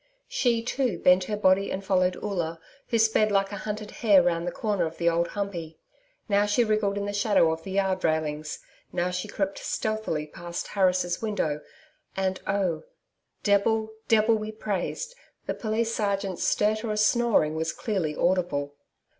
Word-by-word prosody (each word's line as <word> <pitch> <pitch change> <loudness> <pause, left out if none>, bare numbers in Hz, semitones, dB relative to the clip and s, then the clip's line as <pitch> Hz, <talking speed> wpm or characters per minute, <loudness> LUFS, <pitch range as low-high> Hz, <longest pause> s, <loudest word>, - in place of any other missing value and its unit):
She, 245 - +1
too, 245 -5 -1
bent 180 +2 +4
her 210 +1 -2
body 195 -1 +3
and 195 +1 -4
followed 185 -1 +2
Oola, 170 -5 -3 0.3
who 230 - +1
sped 220 -1 +3
like 195 0 +2
a - - -4
hunted 210 0 -5
hare 200 -6 +6
round 170 0 0
the - - -1
comer 200 -5 0
of 160 - -9
the 170 - 0
Old 170 0 +2
Humpey. 170 -6 -4 0.5
Now 205 -1 +3
she 205 +4 +3
wriggled 215 -2 +1
in 200 - -2
the 205 - -3
shadow 205 -5 +3
of 160 0 -3
the 190 +3 -7
yard 190 -1 +1
railings. 155 -1 -1 0.3
Now 180 0 -1
she 180 +3 -3
crept 195 -1 -2
stealthily 215 -8 -2
past 170 +3 -6
Harris' 180 -3 +1
window 185 -9 -1 0.6
and 190 -1 -1
oh! 195 -3 0 0.6
DEBIL 220 +2 +2 0.2
DEBIL 220 0 +4
be 215 0 -4
praised! 215 - -3 0.3
the - - -1
Police 225 +1 -1
sergeant's 200 -4 -1
stertorous 215 0 +1
snoring 235 -12 +3
was 160 +1 -1
clearly 180 -9 -2
audible. 170 -6 0
195 Hz, 165 wpm, -27 LUFS, 175-215 Hz, 0.6 s, hare